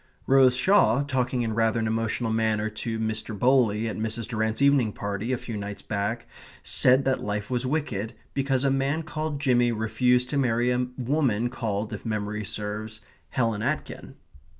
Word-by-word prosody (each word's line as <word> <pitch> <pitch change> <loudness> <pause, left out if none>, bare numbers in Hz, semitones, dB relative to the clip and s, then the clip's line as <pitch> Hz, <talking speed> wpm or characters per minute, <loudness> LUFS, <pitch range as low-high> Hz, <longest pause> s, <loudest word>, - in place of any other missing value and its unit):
Rose 130 -2 +5
Shaw, 140 - +4
talking 130 -3 -1
in 110 -1 -2
rather 115 +1 +1
an 110 - -1
emotional 115 +1 -1
manner 110 -1 0
to 115 +1 -4
Mr. 110 0 -3
Bowley 115 -2 +3
at 110 - -4
Mrs. 110 0 -2
Durrant's 110 -1 -1
evening 140 -6 +3
party 100 +4 -3
a 130 - +1
few 115 -1 -7
nights 100 0 -6
back, 110 +3 -2 0.4
said 130 +1 +3
that 135 -1 +1
life 105 +2 -3
was 125 0 -1
wicked 125 -7 -2 0.2
because 135 -1 0
a 135 - +3
man 135 +4 0
called 155 -2 -4
Jimmy 120 -4 +3
refused 120 +3 +1
to 140 - +1
marry 120 -1 +2
a 125 0 0
woman 125 -3 0
called 110 -3 -3
(if - - -6
memory 105 -1 -3
serves) 105 +2 -5 0.3
Helen 115 -4 0
Aitken. - - -4
115 Hz, 170 wpm, -26 LUFS, 110-130 Hz, 0.4 s, Rose